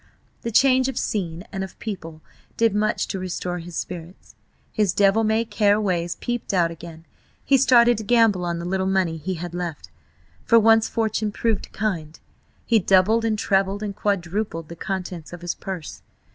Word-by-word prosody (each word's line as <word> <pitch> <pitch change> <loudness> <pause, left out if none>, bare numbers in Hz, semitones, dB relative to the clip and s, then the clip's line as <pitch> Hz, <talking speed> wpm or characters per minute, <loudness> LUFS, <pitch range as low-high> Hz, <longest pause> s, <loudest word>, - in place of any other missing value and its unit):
The 230 - -3
change 260 +2 +4
of 265 - -5
scene 175 -4 -2
and 195 -1 -3
of 190 - -9
people 165 -7 -7 0.4
did 230 -3 +3
much 215 +1 0
to 195 - -3
restore 180 -1 -4
his 170 0 -9
spirits. 175 0 -7 0.4
His 205 -5 +1
devil 200 +2 +4
may 220 +1 +1
care 210 -2 +2
ways 175 -4 -1
peeped 240 -4 -3
out 170 -2 +2
again; 165 0 -11 0.4
he 275 - +4
started 240 -3 +5
to - - -5
gamble 220 -4 +3
on 170 -1 -2
the 170 - -5
little 190 +1 -1
money 185 -4 +1
he 185 +4 -4
had 175 +1 -6
left. 175 -3 -5 0.5
For 230 - +5
once 225 0 +4
Fortune 220 -1 -1
proved 220 -1 -1
kind; 165 -7 -3 0.5
he 230 -2 +4
doubled 200 +4 +3
and 220 -1 0
trebled 195 +1 +1
and 200 -2 -4
quadrupled 190 -4 -2
the 170 - -8
contents 180 -2 -5
of 175 - -8
his 175 0 -2
purse. 185 -5 -7
195 Hz, 175 wpm, -23 LUFS, 175-220 Hz, 0.5 s, started